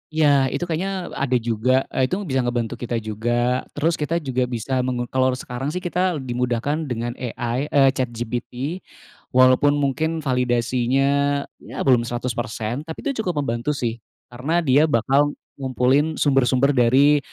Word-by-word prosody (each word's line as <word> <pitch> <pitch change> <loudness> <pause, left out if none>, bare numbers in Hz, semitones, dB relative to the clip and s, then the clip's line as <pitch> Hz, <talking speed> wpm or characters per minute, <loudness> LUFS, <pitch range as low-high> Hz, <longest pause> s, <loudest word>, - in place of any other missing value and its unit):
Iya, 145 -4 +4
itu 130 - -3
kayaknya, 180 +2 -3
e - - -8
ada 125 0 +2
juga, 115 +2 +1 0.2
eee, 130 - +1
itu 180 - -1
bisa 135 -8 -1
ngebantu 120 -1 -2
kita 120 -1 -3
juga. 120 +4 0
Terus 160 +3 0
kita 150 +2 -1
juga 130 -2 0
bisa 125 +2 -2
mengu 125 -1 -2
kalau 130 0 +2
sekarang 125 +1 -5
sih 180 0 -4
kita 180 0 0
le 140 - -5
di 130 - -5
mudahkan 125 +6 -1
dengan 120 -1 -3
AI, 125 +2 -3
eee, 140 -2 +4
ChatGPT. 125 +5 -4 0.6
Walaupun 130 +3 +5
mungkin 155 +3 -1
validasinya, 130 +3 +1 0.2
ya, - - -11
belum 125 -3 +4
100%, 120 +1 -3
tapi 160 - -7
itu 275 -5 -2
cukup 175 -9 -1
membantu 120 +3 -2
sih, 120 -3 -3 0.3
karena 150 +8 -1
dia 145 +2 +4
bakal 140 +2 +2 0.2
ngumpulin 135 +4 +1
sumber-sumber 135 -1 +3
dari, 135 +3 +4
130 Hz, 155 wpm, -22 LUFS, 120-145 Hz, 0.6 s, Walaupun